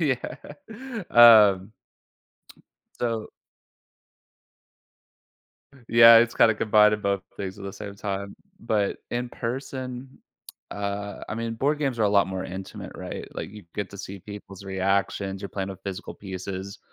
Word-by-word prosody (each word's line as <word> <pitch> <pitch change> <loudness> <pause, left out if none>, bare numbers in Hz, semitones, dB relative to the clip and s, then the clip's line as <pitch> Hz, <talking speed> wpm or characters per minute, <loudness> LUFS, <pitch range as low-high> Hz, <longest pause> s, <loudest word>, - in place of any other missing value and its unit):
Yeah, 220 - -4
um 105 -4 +7 1.3
So 115 -2 -2 2.6
Yeah, 115 0 +9
it's 115 0 +2
kinda 110 - +5
combining 105 -1 +4
both 100 -1 0
things 95 0 -5
at 100 - -9
the 100 - -5
same 100 0 -8
time, 100 0 -4 0.2
but 105 -3 -1
in 120 0 -2
person, 130 +1 -6 0.5
uh, 100 0 -4
I - - -3
mean, 115 0 -3
board 145 +6 0
games 135 -5 -1
are - - +2
a 105 - +4
lot 100 -1 +4
more 95 0 -4
intimate, 95 +1 -7
right, - - -7
like - - -5
you 105 -1 -12
get 100 -2 -4
to 100 - -11
see 100 0 -7
people's 100 0 -10
reactions, 95 0 -1
you're 100 - -4
playing 95 -1 -4
with 95 0 -10
physical 100 +1 -6
pieces. 95 0 -7
105 Hz, 140 wpm, -25 LUFS, 100-115 Hz, 2.6 s, Yeah